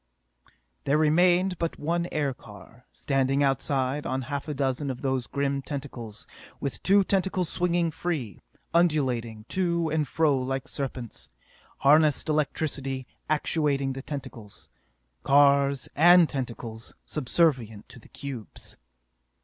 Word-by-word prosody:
There 140 +2 +3
remained 175 +4 +3
but 165 -1 -2
one 170 +3 -1
aircar, 125 -5 -5
standing 135 0 0
outside 135 +1 0
on 130 0 -2
half 140 +3 -4
a 150 - -2
dozen 135 +1 -1
of 130 0 -5
those 130 -2 -1
grim 140 -1 -1
tentacles, 130 -6 -7 0.3
with 140 - -4
two 200 +1 +4
tentacles 190 -3 0
swinging 175 -2 +1
free, 155 - -4 0.3
undulating 130 -10 +1
to 170 -3 0
and 155 -2 0
fro 150 -4 +2
like 135 +1 -3
serpents. 130 -4 -6 0.5
Harnessed 150 +1 +4
electricity 140 -3 -1 0.2
actuating 145 -3 +1
the 135 - -6
tentacles 120 -8 -8 0.5
cars 140 -1 +4
and 175 +2 +7
tentacles 120 -4 -6
subservient 130 -7 0
to 125 - -12
the - - -18
cubes. 130 -7 -8
140 Hz, 115 wpm, -27 LUFS, 130-160 Hz, 0.5 s, and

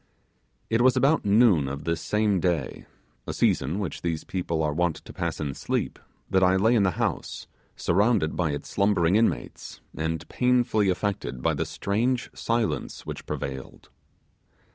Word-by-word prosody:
It 115 +1 +3
was 130 +1 +4
about 140 +2 +3
noon 100 - +4
of 70 +2 -5
this 85 0 -1
same 105 -2 +1
day, 85 -6 -2 0.4
a - - -3
season 70 +8 +1
which 100 -5 -4
these 85 -2 -2
people 85 -3 -2
are 75 -1 0
wont 85 0 +1
to - - -12
pass - - -3
in 70 -3 -2
sleep, - - -2 0.3
that 95 - +2
I 95 0 +4
lay 110 +5 +3
in 115 - +4
the 95 - +3
house, - - -2 0.3
surrounded 100 -2 +2
by 85 -3 0
its 75 0 -4
slumbering 100 -3 +2
inmates, 115 +1 -1 0.2
and 80 0 -3
painfully 120 -5 +2
affected 90 -9 -2
by 80 - +2
the 80 +2 -1
strange 115 +10 -1
silence 115 -2 -2
which - - -7
prevailed. 65 -1 -6
95 Hz, 160 wpm, -26 LUFS, 80-110 Hz, 0.4 s, was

